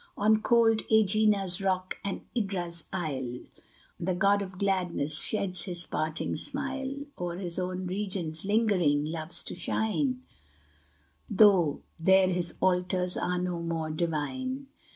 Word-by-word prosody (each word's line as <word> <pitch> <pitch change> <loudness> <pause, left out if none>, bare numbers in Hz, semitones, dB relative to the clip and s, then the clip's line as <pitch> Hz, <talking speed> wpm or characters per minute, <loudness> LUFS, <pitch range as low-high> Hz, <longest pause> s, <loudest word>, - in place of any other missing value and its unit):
On 215 +1 +4
cold 225 -1 +4
Ægina's 210 -3 +3
rock 185 -1 0
and 200 - -3
Idra's 180 -6 -2
isle 135 -9 -3 0.6
The 180 +1 -1
god 200 +3 +3
of 190 -2 -6
gladness 180 -6 0
sheds 190 -4 -1
his 175 -3 -4
parting 155 +1 -2
smile; 275 0 -4
O'er 175 -1 -3
his 180 -2 -4
own 185 0 -3
regions 180 -4 -3
lingering, 195 -9 +2
loves 160 +2 -2
to - - -3
shine, 255 +8 -1 1.1
Though 195 -8 +5 0.2
there 190 +2 +5
his 175 -2 -2
altars 180 0 +1
are 180 0 -1
no 180 -1 -2
more 165 -2 -2
divine. 255 - -2
185 Hz, 125 wpm, -29 LUFS, 170-210 Hz, 1.1 s, Though